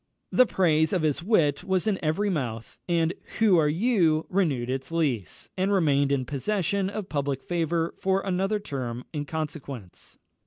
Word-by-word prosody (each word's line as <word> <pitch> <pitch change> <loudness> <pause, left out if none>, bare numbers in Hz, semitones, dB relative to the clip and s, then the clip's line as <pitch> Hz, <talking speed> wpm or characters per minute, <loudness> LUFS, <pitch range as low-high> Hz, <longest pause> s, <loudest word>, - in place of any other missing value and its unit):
The 255 - +5
praise 160 -5 +2
of 180 -4 +1
his 155 +1 +1
wit 165 -7 +2
was 190 -1 0
in 205 -5 -1
every 195 +7 +1
mouth, 115 -9 -4
and 165 0 +2 0.2
"Who 205 -6 +5
are 150 -2 +3
you?" 165 -4 +2
renewed 155 -11 +1
its 135 +3 -4
lease, 130 - -2
and 190 +2 0
remained 145 -7 +3
in 135 -2 +1
possession 195 +7 -1
of 205 -1 -5
public 140 -4 -2
favour 170 -1 -1
for 190 0 +1
another 195 +2 0
term 125 - -5
in 145 -1 -3
consequence. 140 - -7
160 Hz, 160 wpm, -26 LUFS, 140-190 Hz, 0.2 s, The